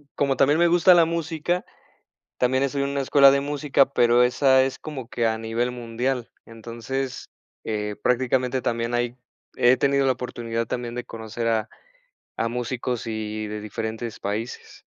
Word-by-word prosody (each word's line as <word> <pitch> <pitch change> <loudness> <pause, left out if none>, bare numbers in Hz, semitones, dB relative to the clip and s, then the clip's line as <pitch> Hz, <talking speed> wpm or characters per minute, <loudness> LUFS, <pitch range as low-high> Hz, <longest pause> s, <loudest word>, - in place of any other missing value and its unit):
como 140 -2 +1
también 145 +4 +4
me 175 - +5
gusta 175 +2 +6
la 170 -2 +6
música, 165 +1 -2 0.7
también 130 +2 +2
estoy 140 0 -1
en 140 - -1
una 140 0 -1
escuela 140 0 +6
de 140 0 +2
música, 140 -1 +1
pero 120 -1 +4
esa 130 +1 +4
es 135 0 -2
como 135 -6 -7
que 120 - -1
a 110 0 0
nivel 115 +2 -2
mundial. 120 +1 -3 0.2
Entonces, 115 +4 -5 0.3
eh, 105 -1 -3
prácticamente, 125 +1 +1
también 115 0 -2
hay 120 0 -1 0.4
he 120 +1 +6
tenido 140 +1 +2
la 135 - +4
oportunidad 115 -2 -4
también 120 0 -4
de 125 - -4
conocer 115 0 -5
a 110 -2 0 0.7
a 115 - 0
músicos 125 0 -3
y 110 -1 -4
de 105 0 -5
diferentes 110 +2 -5
países. 105 +4 -5
125 Hz, 160 wpm, -24 LUFS, 115-135 Hz, 0.7 s, gusta